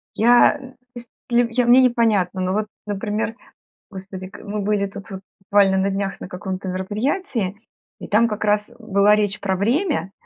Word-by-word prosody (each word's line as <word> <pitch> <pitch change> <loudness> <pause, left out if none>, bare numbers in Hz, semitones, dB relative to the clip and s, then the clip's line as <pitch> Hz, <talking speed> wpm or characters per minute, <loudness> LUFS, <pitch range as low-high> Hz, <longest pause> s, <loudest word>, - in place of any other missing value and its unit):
Я, 240 +5 +5
то 260 -2 -13 0.2
есть, 240 0 -10 0.2
я, 240 0 +2
мне 245 +2 +7
непонятно, 220 -7 +2
ну 185 0 0
вот, 215 +1 -1 0.2
например, 210 +2 -3 0.6
господи, 190 -1 -8
к - - -12
мы 210 0 -4
были 200 0 0
тут 200 +1 -10
вот 190 - -7 0.2
буквально 195 -1 +3
на 190 +1 +1
днях 195 0 -3
на - - -6
каком-то 185 +1 -5
мероприятии, 210 - -2 0.4
и - - -8
там 225 +3 +3
как 215 -1 -4
раз 210 +2 +1
была 210 -2 +3
речь 210 -1 -1
про 190 -2 -1
время, 250 - 0
205 Hz, 170 wpm, -21 LUFS, 195-235 Hz, 0.6 s, мне